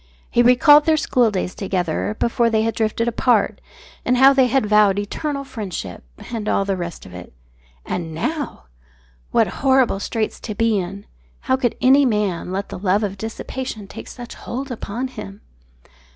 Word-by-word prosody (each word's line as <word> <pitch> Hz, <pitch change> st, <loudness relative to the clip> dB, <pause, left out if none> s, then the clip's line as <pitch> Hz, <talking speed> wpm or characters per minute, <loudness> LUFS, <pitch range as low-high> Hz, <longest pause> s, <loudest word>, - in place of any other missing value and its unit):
He 240 Hz, -, +4 dB
recalled 290 Hz, +5 st, +6 dB
their 315 Hz, -1 st, +3 dB
schooldays 220 Hz, -11 st, +1 dB
together 175 Hz, -, -2 dB
before 235 Hz, 0 st, +2 dB
they 220 Hz, -1 st, +2 dB
had 225 Hz, 0 st, 0 dB
drifted 225 Hz, +1 st, -1 dB
apart, 235 Hz, +1 st, +1 dB, 0.4 s
and 250 Hz, +1 st, +2 dB
how 270 Hz, +2 st, +7 dB
they 265 Hz, -2 st, +4 dB
had 255 Hz, -1 st, +1 dB
vowed 210 Hz, -2 st, +4 dB
eternal 275 Hz, +8 st, -3 dB
friendship 185 Hz, -, -6 dB, 0.3 s
and 215 Hz, -2 st, -3 dB
all 195 Hz, -, +1 dB
the 195 Hz, -1 st, 0 dB
rest 175 Hz, -2 st, -6 dB
of 90 Hz, -, -12 dB
it. 90 Hz, 0 st, -10 dB, 0.5 s
And 165 Hz, -2 st, -4 dB
now! 285 Hz, -, -3 dB, 0.7 s
What -, -, +3 dB, 0.2 s
horrible 265 Hz, -6 st, +3 dB
straits 220 Hz, +1 st, -3 dB
to 215 Hz, -, -6 dB
be 225 Hz, -1 st, +2 dB
in. 195 Hz, +3 st, -6 dB, 0.4 s
How 260 Hz, -, +1 dB
could 255 Hz, -3 st, 0 dB
any 270 Hz, +2 st, +6 dB
man 205 Hz, -6 st, -1 dB
let 195 Hz, +1 st, -3 dB
the -, -, -7 dB
love 200 Hz, +2 st, +1 dB
of 200 Hz, -2 st, -2 dB
dissipation 220 Hz, 0 st, -5 dB
take -, -, -9 dB
such 240 Hz, -2 st, -9 dB
hold 265 Hz, +2 st, -6 dB
upon 240 Hz, +2 st, -4 dB
him? 210 Hz, -4 st, -9 dB
220 Hz, 165 wpm, -21 LUFS, 195-255 Hz, 0.7 s, how